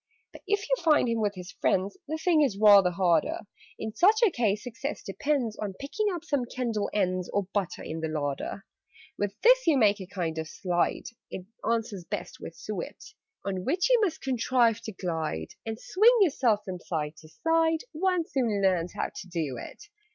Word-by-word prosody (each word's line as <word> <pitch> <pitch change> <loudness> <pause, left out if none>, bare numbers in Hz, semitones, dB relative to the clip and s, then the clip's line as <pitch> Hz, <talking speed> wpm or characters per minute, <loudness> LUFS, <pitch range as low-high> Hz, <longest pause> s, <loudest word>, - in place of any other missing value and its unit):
"But - - -12
if 410 +1 0
you - - +3
find 305 -6 +4
him 230 -1 0
with 205 -1 0
his 180 0 -8
friends, 195 +1 0
The 315 +2 -2
thing 320 -1 +3
is 255 -9 +1
rather 200 -3 +7
harder. 175 -3 +1 0.4
In 220 -1 -5
such 420 - +4
a 410 - +3
case 215 -6 0
success 260 +4 -5
depends 245 +1 -1
On 200 -3 -4
picking 350 - -2
up 345 -3 -5
some 285 -6 0
candle 235 -4 -2
ends, 185 -3 0
Or 205 - 0
butter, 200 -4 -2
in 160 - -5
the 160 - -2
larder. 150 +5 -3 0.5
"With 205 -1 -2
this - - +5
you 310 -4 +5
make 210 -4 +3
a 185 - -7
kind 170 -4 -3
of 160 - -4
slide 175 +1 -1 0.3
(It 185 - -7 0.3
answers 220 -5 -2
best - - -6
with - - -8
suet), - - -7 0.3
On 190 -2 -2
which 360 - +1
you 485 -2 +5
must 360 -7 0
contrive 245 -3 +2
to 220 - -4
glide, 160 - -3 0.2
And 220 0 -4
swing 460 +6 +4
yourself 255 - +3
from 185 -2 -5
side 155 -4 -3
to 155 0 -15
side 325 - +1
One 360 +1 +1
soon 235 -7 0
learns 180 -3 +1
how - - -2
to - - -8
do 160 -8 -3
it. - - -10
215 Hz, 190 wpm, -28 LUFS, 185-300 Hz, 0.5 s, rather